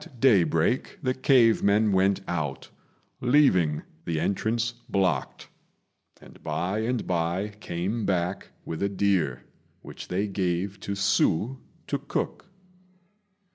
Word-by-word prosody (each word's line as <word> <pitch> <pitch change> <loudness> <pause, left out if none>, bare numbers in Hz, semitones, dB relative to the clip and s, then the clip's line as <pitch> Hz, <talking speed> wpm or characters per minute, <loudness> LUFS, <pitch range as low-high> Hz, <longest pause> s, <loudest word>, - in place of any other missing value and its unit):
At 125 - -15
daybreak 100 - +2
the 130 -1 +1
cave 130 -4 +4
men 105 +1 +3
went 95 +1 +2
out, 75 -6 -3 0.5
leaving 110 - +3 0.2
the 80 -2 -2
entrance 115 +5 0 0.2
blocked, 95 -2 -1 0.7
and - - -16
by 90 +7 -2
and 120 +2 -1
by 90 +3 -1
came 95 +6 -3
back 90 0 -1 0.2
with 80 - -5
a 100 - +1
deer, 95 -10 0 0.4
which - - -9
they 95 +3 -1
gave 95 0 -2
to 100 - -4
Hsü 100 +4 +1 0.3
to 140 - -2
cook. 145 +6 -4
100 Hz, 120 wpm, -26 LUFS, 85-115 Hz, 0.7 s, cave